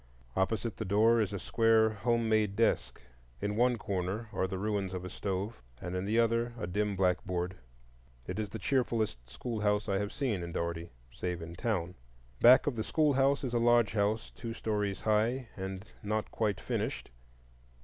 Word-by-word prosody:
Opposite 110 +4 0
the - - -2
door 110 +4 +4
is 105 - 0
a 100 - -3
square 110 +2 +3
home 115 +2 0
made 110 -2 +2
desk. 115 +2 +1 0.4
In 105 +1 -2
one 120 +1 +3
corner 100 +2 -3
are 95 - 0
the 95 0 -4
ruins 100 -2 -1
of 90 0 -5
a 90 - -6
stove, 100 +3 -3 0.2
and 90 0 -5
in 90 +1 -2
the 110 +3 +1
other 115 +1 +2
a 105 - -3
dim 105 +3 -1
blackboard. 90 -1 0 0.7
It 90 +8 -4
is 105 -2 -2
the 110 - -5
cheerfulest 110 - 0
schoolhouse 105 - -1
I 100 -1 +1
have 105 +1 -2
seen 125 -10 -1
in 85 -1 -6
Dougherty, 85 0 -3 0.2
save 90 +4 -3
in 85 +1 -7
town. 90 -2 -1 0.5
Back 125 +2 +8
of 145 - 0
the 110 - 0
schoolhouse 140 -2 +2
is 125 -2 -2
a 120 - +2
lodgehouse 115 -2 +2
two 115 -1 -6
stories 105 -3 -1
high 115 +3 +1
and 95 0 -5 0.2
not 105 +1 -2
quite 105 -4 0
finished. - - -3
105 Hz, 175 wpm, -31 LUFS, 95-115 Hz, 0.7 s, Back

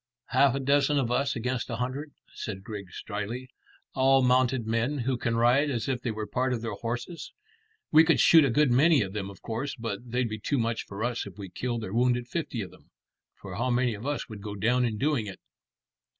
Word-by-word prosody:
"Half 140 -1 +4
a - - -1
dozen 145 +2 +2
of 125 -4 0
us 140 +3 +1
against 125 +1 -2
a 115 - -2
hundred," 130 +5 -4 0.2
said 95 -3 -6
Griggs 100 -3 -7
dryly; 110 +5 -4 0.4
"all 135 0 +4
mounted 125 -1 +3
men 115 +6 0
who 130 0 0
can 120 -1 -1
ride 125 +6 +4
as 120 -5 -2
if 130 -2 -1
they 125 - -2
were 110 -1 -3
part 130 +3 0
of 115 -2 -3
their 115 - -3
horses. 120 +8 -5 0.6
We 160 +1 +8
could 165 0 +3
shoot 165 -2 +7
a 140 - +3
good 140 +2 +3
many 140 +1 +5
of 95 -1 -6
them, 100 -2 -3
of 100 - -13
course, 125 +5 -3
but 115 -1 -5
they'd 125 +1 0
be 110 -1 -5
too 140 +7 -1
much 115 -1 -1
for 100 +2 -5
us 120 -3 -2
if 100 - -11
we 100 -2 -7
killed 120 +4 -3
or 100 - -5
wounded 120 0 +2
fifty 140 -6 -3
of 90 - -9
them. - - -20 0.5
For 95 -2 -8
how 125 +3 0
many 125 -1 +2
of 105 +6 -6
us 145 -1 -2
would 110 -3 -9
go 105 0 -6
down 120 +5 +2
in 110 -3 -2
doing 140 -4 0
it?" 95 - -8
120 Hz, 225 wpm, -28 LUFS, 110-135 Hz, 0.6 s, We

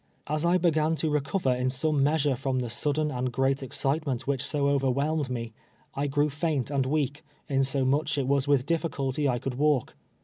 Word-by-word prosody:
As 150 +2 -1
I 175 +1 +4
be 175 -1 +3
gan 155 +1 +1
to 160 -1 -1
recover 145 -1 +1
in 125 +1 0
some 145 +2 0
measure 145 -1 +2
from 130 +1 -2
the 125 -2 -2
sudden 150 +4 0
and 125 -1 -2
great 135 +2 +1
excitement 135 0 -2
which 135 -1 -1
so 140 0 0
overwhelmed 140 +2 +1
me, 115 -2 -4 0.4
I 140 +1 -1
grew 145 +1 +1
faint 145 -3 -1
and 135 -2 +1
weak, 145 0 -1 0.2
insomuch 135 +2 +1
it 140 - 0
was 140 0 +1
with 140 -3 +3
ditliculty 145 -3 -1
I 125 - +1
could 130 +2 -4
walk. 150 -5 +2
140 Hz, 190 wpm, -27 LUFS, 130-150 Hz, 0.4 s, I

